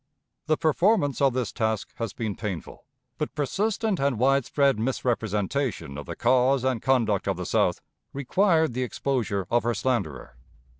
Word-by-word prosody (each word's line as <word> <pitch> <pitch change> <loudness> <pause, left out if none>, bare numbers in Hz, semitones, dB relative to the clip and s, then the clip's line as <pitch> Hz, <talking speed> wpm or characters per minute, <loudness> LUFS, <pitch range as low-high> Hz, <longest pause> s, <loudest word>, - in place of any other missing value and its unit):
The 155 - +2
performance 160 -2 +2
of 135 -2 +4
this 125 -5 -2
task 110 -3 -2
has 115 -3 -3
been 110 -3 -4
painful, 100 -7 -6 0.3
but - - -3
persistent 200 - 0
and 140 -3 +1
widespread 135 0 +2
misrepresentation 115 - -1
of 75 - -7
the - - -5
cause 130 +1 +3
and 130 -4 0
conduct 115 -7 +1
of - - 0
the - - -4
South - - +1 0.3
required 160 - +2
the 130 - -2
exposure 120 -6 -1
of 120 0 +3
her 120 0 -1
slanderer. 80 - -2
130 Hz, 150 wpm, -26 LUFS, 110-140 Hz, 0.3 s, of